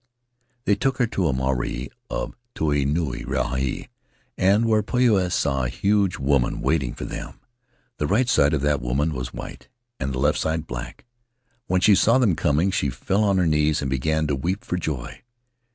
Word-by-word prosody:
"They 105 - +4
took 135 +5 0
her 125 - +3
to 100 -5 -1
the 80 - +2
marae 65 -1 -2 0.2
of - - -4 0.2
Tai 70 -3 +1
Nuu 75 -3 -1
Rahi, 65 -1 -2 0.5
and 100 +5 +3
there 110 -1 +3
Poia 105 -5 +2
saw 70 -5 0
a - - -1
huge 100 -2 +1
woman 70 -2 +1
waiting 70 -7 0
for - - -6
them. - - -7 0.6
The 75 - -1
right 115 - +2
side 75 -10 +3
of 70 - -1
that 75 0 +1
woman 70 +6 0
was 65 -3 -5
white, - - -9 0.3
and 65 0 -2
the 65 - -3
left 75 +3 +2
side 80 0 -1
black; - - -7 0.6
when 95 0 +1
she 105 - +6
saw 115 +5 +4
them 115 -10 +3
coming 80 +6 +1
she 70 - 0
fell 95 - 0
on 100 -2 +2
her 90 - +2
knees 75 -1 +2
and 70 -1 -2
began 80 +4 0
to 75 -2 0
weep 90 +9 -3
for - - -2
joy. 75 -8 -4
75 Hz, 185 wpm, -23 LUFS, 65-95 Hz, 0.6 s, she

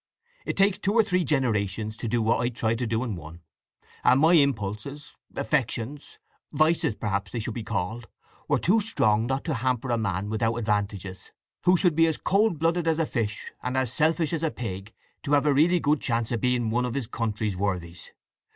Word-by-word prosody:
It - - -2
takes 195 0 +3
two 200 - 0
or 225 - +6
three 180 -4 +1
generations 110 - -1
to 115 - -4
do 115 +1 0
what 115 +2 +2
I 120 - +1
tried 115 -1 -1
to 120 - -1
do 115 +2 0
in 115 -6 -3
one; 85 0 -10 0.6
and 130 +2 +5
my 160 +4 +5
impulses—affections—vices 140 - -1
perhaps 100 -3 -2
they - - -4
should 115 0 -3
be 115 - -5
called—were 110 +4 -4
too 210 +6 +3
strong 110 - +2
not 135 +1 -1
to 160 - -1
hamper 130 0 -1
a 120 - +1
man 100 -1 -2
without 115 +1 0
advantages; 105 -4 -3 0.4
who 180 +1 +5
should 175 -3 +3
be 165 +1 +5
as 160 - 0
cold 200 -2 +2
blooded 165 +2 0
as 160 -1 +2
a 165 - +1
fish 110 -6 -3
and 125 +1 -2
as 130 -2 0
selfish 160 +1 +1
as 160 - -1
a 165 - +1
pig 100 -6 -6 0.3
to 145 - -2
have 145 0 +4
a 145 - +4
really 170 +6 +4
good 150 -1 +1
chance 115 -2 -1
of 115 -3 -1
being 125 -3 +1
one 125 +2 +1
of 125 - -4
his 135 -3 -1
country's 110 -3 -2
worthies. 90 -3 -3
120 Hz, 195 wpm, -26 LUFS, 110-150 Hz, 0.6 s, or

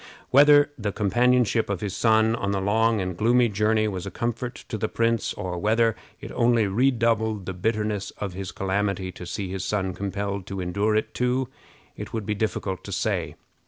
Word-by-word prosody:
Whether 145 +1 +6
the 105 -2 -1
companionship 120 +2 +2
of 100 -3 -2
his 100 -3 -3
son 110 0 +3
on 100 -3 -2
the 100 -1 0
long 110 +3 +2
and 90 -2 -3
gloomy 120 +5 +3
journey 110 +1 +1
was 95 -2 -4
a - - -2
comfort 120 +3 -3
to - - -3
the 110 0 -1
prince, 115 -1 0
or 90 -3 -4
whether 110 +3 +2 0.2
it - - -8
only 115 -2 +3
redoubled 110 -2 +1
the 95 - -4
bitterness 105 +1 -1
of 100 -3 -4
his 95 0 -5
calamity 100 -1 -1
to 90 0 -9
see 95 +1 -4
his 95 -1 -3
son 95 -3 -1
compelled 100 0 -4
to 95 -1 -5
endure 100 +4 0
it 110 - -1
too, 125 +1 0 0.5
it - - -8
would 110 -3 -3
be 105 - -1
difficult 100 -3 -2
to 100 - -7
say. 90 -6 -1
105 Hz, 190 wpm, -25 LUFS, 95-115 Hz, 0.5 s, Whether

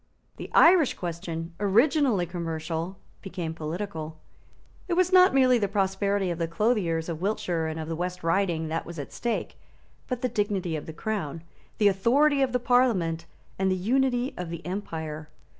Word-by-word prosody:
The - - -7
Irish 335 -5 +6
question, 170 -1 -5
originally 230 - +3
commercial, 165 +1 -4 0.2
became 180 -4 -5
political. 160 0 -5 0.7
It 360 - -1
was 365 +1 +2
not 370 0 +7
merely 255 -2 +4
the 205 - +1
prosperity 195 -1 0
of 170 - -4
the 165 - 0
clothiers 165 -3 0
of 165 -1 -5
Wiltshire 180 -5 -1
and 160 0 -4
of 155 - -5
the 165 - -3
West 180 +1 -4
Riding 165 -2 +1
that 165 +1 -2
was 170 0 -8
at 145 - -7
stake; 240 -1 -3 0.5
but 250 -1 -4
the - - +3
dignity 205 -7 -1
of 150 - -6
the - - -5
Crown, 165 -4 -4 0.3
the 210 - +4
authority 275 +9 +3
of 265 -2 +2
the 250 - +1
Parliament, 210 -10 +2 0.3
and 190 0 +2
the 185 - +2
unity 250 +6 +1
of 180 -2 -5
the 170 -2 -7
empire. 160 -5 -5
185 Hz, 170 wpm, -27 LUFS, 165-235 Hz, 0.7 s, not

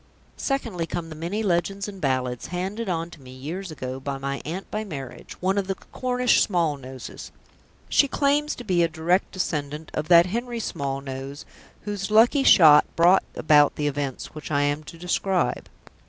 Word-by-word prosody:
Secondly, 230 - -2
come 170 -1 -4
the 155 - -8
many 175 +8 -3
legends 195 +1 0
and 195 -2 -9
ballads 130 -3 -1
handed 190 +5 -3
on 170 -1 -2
to 150 - -13
me 130 - -13
years 155 +9 -6
ago 130 -4 -5
by 135 0 -4
my 140 0 -4
aunt 180 +5 -6
by 215 +1 -2
marriage, 140 - -8
one 190 +2 +1
of 195 - -3
the 195 - -1
Cornish 250 +4 +1
Smallnoses. 145 - -2 0.6
She 285 - +4
claims 290 +2 +1
to 245 - -8
be 185 -6 +1
a 170 - +4
direct 165 +4 0
descendant 150 -4 -3
of 150 +1 -3
that 170 -1 +7
Henry 235 +5 -3
Smallnose 135 -4 -5 0.4
whose 205 -1 -4
lucky 230 +6 +5
shot 155 - +7
brought 175 +3 +5
about 150 -2 +4
the 150 - -2
events 140 -2 -3
which 155 -1 -8
I 145 -1 +2
am 145 +1 0
to 165 - -10
describe. 180 -4 -1
170 Hz, 170 wpm, -24 LUFS, 145-195 Hz, 0.6 s, that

